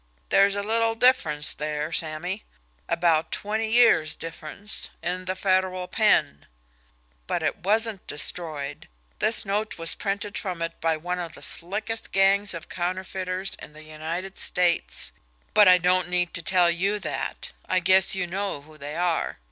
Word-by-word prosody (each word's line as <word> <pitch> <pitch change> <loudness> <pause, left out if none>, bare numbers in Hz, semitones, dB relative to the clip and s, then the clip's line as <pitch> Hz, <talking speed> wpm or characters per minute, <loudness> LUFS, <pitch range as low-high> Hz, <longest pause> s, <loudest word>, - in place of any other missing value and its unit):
"There's 200 0 +4
a 200 - -2
little 225 +1 +1
difference 175 - +2
there, 150 +1 -3
Sammy 165 +5 -1 0.5
about 165 -2 +2
twenty 220 +2 -2
years' 225 -9 +4
difference 165 +5 -5
in 180 +2 -2
the 185 +1 -2
Federal 185 -1 0
pen. 195 - +2 0.8
But - - -1
it - - 0
wasn't 215 +1 +1
destroyed; 150 -2 -2 0.3
this 220 0 +1
note 210 +2 -2
was 165 -1 -1
printed 200 +1 -3
from 180 -4 -4
it 165 - -5
by 160 0 +1
one 180 +3 -3
of 170 -2 -6
the - - -12
slickest 210 +6 -3
gangs 195 0 +3
of 165 +1 -8
counterfeiters 185 +1 -2
in 150 - -10
the 155 0 -13
United 160 +5 -6
States 170 - +2 0.4
but 210 -2 +7
I 180 0 +8
don't 180 0 +2
need 180 -1 0
to 170 - -2
tell 175 0 +4
you 195 +5 0
that, - - -4 0.2
I 185 - +3
guess 190 +2 +5
you 185 -2 -1
know 190 -4 -3
who 155 +1 -17
they 145 +2 -6
are. 175 -1 0
180 Hz, 155 wpm, -25 LUFS, 165-200 Hz, 0.8 s, I